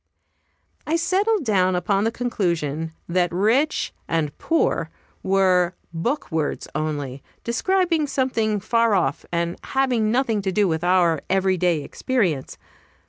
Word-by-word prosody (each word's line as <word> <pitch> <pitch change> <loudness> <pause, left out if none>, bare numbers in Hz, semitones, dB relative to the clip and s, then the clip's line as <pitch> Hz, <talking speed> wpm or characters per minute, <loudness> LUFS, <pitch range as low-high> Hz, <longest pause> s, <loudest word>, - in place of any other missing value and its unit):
I 315 - +1
settled 380 +2 +1
down 185 -4 +2
upon 195 +3 +1
the 225 - +1
conclusion 170 - -2 0.2
that 175 0 +1
"rich" 225 - +1
and 155 -3 -1
"poor" 170 - +1 0.3
were 185 -2 +2 0.2
book 240 - -2
words 160 -2 -2
only, 145 -4 -3 0.2
describing 335 +5 +1
something 230 -6 0
far 230 +1 +2
off, 180 - -1
and 170 0 -1
having 255 -5 +1
nothing 235 -4 +1
to 190 -1 -1
do 205 +1 +2
with 160 -1 -1
our 175 -4 +3
every 190 0 +2
day 170 -4 +1
experience. 180 - -1
195 Hz, 130 wpm, -23 LUFS, 170-245 Hz, 0.3 s, our